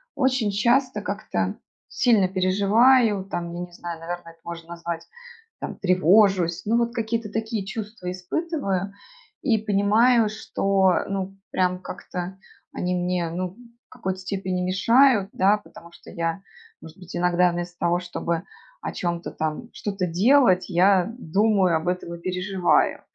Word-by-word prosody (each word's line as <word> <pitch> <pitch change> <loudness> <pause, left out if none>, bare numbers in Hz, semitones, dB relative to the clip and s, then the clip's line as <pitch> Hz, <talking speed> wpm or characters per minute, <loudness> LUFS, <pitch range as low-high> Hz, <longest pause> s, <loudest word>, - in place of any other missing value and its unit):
очень 260 -5 +1
часто 235 +3 +2
как-то 200 - -3 0.3
сильно 210 -6 +3
переживаю, 200 +3 +3
там, 170 -3 -4
я 175 - -5
не 175 - -20
знаю, 170 -1 -7
наверное, 170 0 -6
это 165 - -24
можно 170 -1 -8
назвать, 170 -1 -5 0.6
там, - - -5
тревожусь. 185 -1 +3
Ну, 225 +3 +2
вот 235 0 0
какие-то 230 -2 -2
такие 220 -2 -3
чувства 205 -2 -6
испытываю 195 - -2 0.5
и 235 -6 +2
понимаю, 215 +3 +3
что, 195 -3 +1
ну, 195 0 -4
прям 180 -1 +1
как-то 180 0 -6 0.4
они 180 0 -2
мне, 180 -1 -1
ну, 180 +2 -4 0.3
в - - -
какой-то 190 -6 -4
степени 185 -1 -3
мешают, 205 +4 +4
да, 200 +3 +3
потому 170 -4 -15
что - - -14
я, 165 +2 -2 0.4
может 160 +2 -12
быть, 180 -2 -10
иногда 180 0 +3
вместо 175 0 -5
того, 175 +1 +1
чтобы 170 -2 -3 0.4
о - - -4
чем-то 170 -1 -3
там, 155 +9 -4
что-то 195 -3 -3
делать, 190 +1 +4
я 185 +1 +4
думаю 195 -3 +2
об 160 +2 -6
этом 180 -1 -2
и - - -11
переживаю. 185 0 +1
190 Hz, 145 wpm, -24 LUFS, 175-215 Hz, 0.6 s, мешают